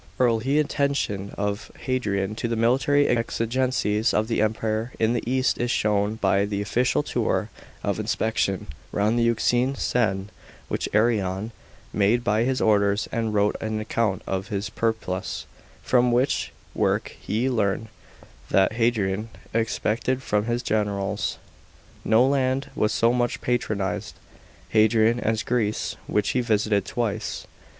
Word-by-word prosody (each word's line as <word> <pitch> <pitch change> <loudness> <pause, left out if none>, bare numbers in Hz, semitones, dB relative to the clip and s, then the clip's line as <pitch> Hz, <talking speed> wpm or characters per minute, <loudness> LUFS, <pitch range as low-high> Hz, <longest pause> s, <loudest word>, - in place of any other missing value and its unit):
rl 120 -3 +3
he 135 +5 +1
atten 140 -1 +1
tion 100 -6 -2
of 100 +1 -3
Hadrian 105 -6 -1
to 115 - -3
the 115 - -1
military 130 +5 +3
exigencies 115 -2 0
of 110 +1 +2
the 115 - 0
Empire 110 +2 -1
in 110 +1 +2
the 120 - 0
east 130 0 +1
is 120 - 0
shown 105 -1 +1
by 100 -2 +2
the 100 0 -2
official 125 +7 +1
tour - - -1 0.3
ot - - 0
inspection 105 -4 0 0.3
round 105 +4 +1
the 115 - +3
Euxine 120 +3 +1
sen, 105 -6 0 0.4
which - - -2
Arrian 105 -2 +1 0.4
made 105 +4 +2
by 110 +1 +2
his 130 0 0
orders, 100 -1 +2
and 110 -2 -1
wrote 105 0 +2
an 110 0 -2
account 110 -3 -1
of 95 +1 -3
in 105 - -3
his 100 +1 -3
PeripluS) 110 -5 -2 0.4
from 125 -1 +3
which 125 +3 +1 0.2
work - - 0
we 115 +5 +1
learn 110 -3 0 0.6
what 95 +2 +3
Hadrian 110 -3 0 0.2
expected 115 +3 0
from 105 -3 0
his 120 +1 -1
generals. 100 -1 -1 0.6
§ - - -26
16. - - -5
No 115 +3 +6
land 135 0 0
was 105 - +1
so 115 +1 +3
much 120 -1 0
patronised 105 -4 -2
b\ 110 - -5
Hadrian 110 +2 +4
as 110 -1 0
Greece, 110 -4 -1
which 105 - +1
he 125 - +1
visited 105 -3 +1
twice. 115 0 -3
110 Hz, 150 wpm, -25 LUFS, 105-120 Hz, 0.6 s, No